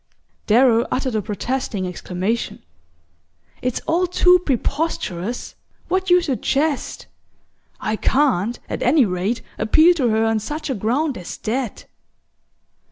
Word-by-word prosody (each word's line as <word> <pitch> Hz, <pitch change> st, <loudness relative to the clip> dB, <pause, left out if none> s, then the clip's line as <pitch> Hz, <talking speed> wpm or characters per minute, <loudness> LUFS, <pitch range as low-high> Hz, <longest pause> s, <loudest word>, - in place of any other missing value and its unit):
Darrow 235 Hz, +1 st, +4 dB
uttered 260 Hz, -1 st, -1 dB
a 215 Hz, -, 0 dB
protesting 210 Hz, 0 st, -3 dB
exclamation. 185 Hz, +5 st, -3 dB, 1.0 s
"It's 250 Hz, -1 st, -2 dB
all 350 Hz, +3 st, +1 dB
too 360 Hz, 0 st, +5 dB
preposterous 250 Hz, -, -2 dB, 0.4 s
what 375 Hz, 0 st, 0 dB
you 355 Hz, 0 st, +5 dB
suggest! 285 Hz, 0 st, -1 dB, 0.7 s
I 215 Hz, -, -2 dB
can't, 240 Hz, -6 st, +1 dB
at -, -, -4 dB
any 265 Hz, +1 st, +4 dB
rate, 195 Hz, +5 st, -2 dB, 0.2 s
appeal 315 Hz, +11 st, +5 dB
to 255 Hz, -6 st, +2 dB
her 220 Hz, 0 st, +2 dB
on 225 Hz, -1 st, +1 dB
such 295 Hz, +7 st, -4 dB
a -, -, +1 dB
ground 255 Hz, +6 st, -1 dB
as 175 Hz, -, -7 dB
that!" 240 Hz, +1 st, -3 dB
245 Hz, 120 wpm, -21 LUFS, 215-300 Hz, 1.0 s, too